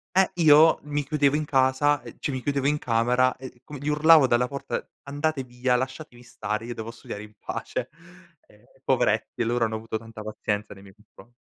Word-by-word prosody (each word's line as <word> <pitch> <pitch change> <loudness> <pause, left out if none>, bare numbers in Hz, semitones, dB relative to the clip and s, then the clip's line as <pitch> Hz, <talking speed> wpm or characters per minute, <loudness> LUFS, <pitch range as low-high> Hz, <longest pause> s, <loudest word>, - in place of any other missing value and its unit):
e 190 0 +4
io 155 +1 +7
mi 145 -1 -3
chiudevo 145 -1 +2
in 155 - -2
casa, 135 +1 +2
ehm, - - -11
cioè 140 - -3
mi 130 - -4
chiudevo 140 -1 0
in 150 +1 +2
camera 125 +2 +2
e 130 -2 -11
com 145 - -9
gli 145 +2 -7
urlavo 150 -1 +6
dalla 125 0 +2
porta: 140 0 -4 0.2
"Andate 145 0 -2
via, 125 0 0
lasciatemi 130 0 -6
stare, 110 -2 -5
io 120 - -5
devo 115 0 -7
studiare 105 -2 -8
in 105 0 -14
pace." - - -5 0.6
Ehm - - -23 0.2
poveretti, 120 - +1
loro 120 +1 0
hanno 110 0 -3
avuto 110 0 -4
tanta 115 0 -11
pazienza 105 -1 -4
nei 95 - -15
miei 95 -1 -16
confron 110 +2 -20
130 Hz, 195 wpm, -25 LUFS, 115-145 Hz, 0.6 s, io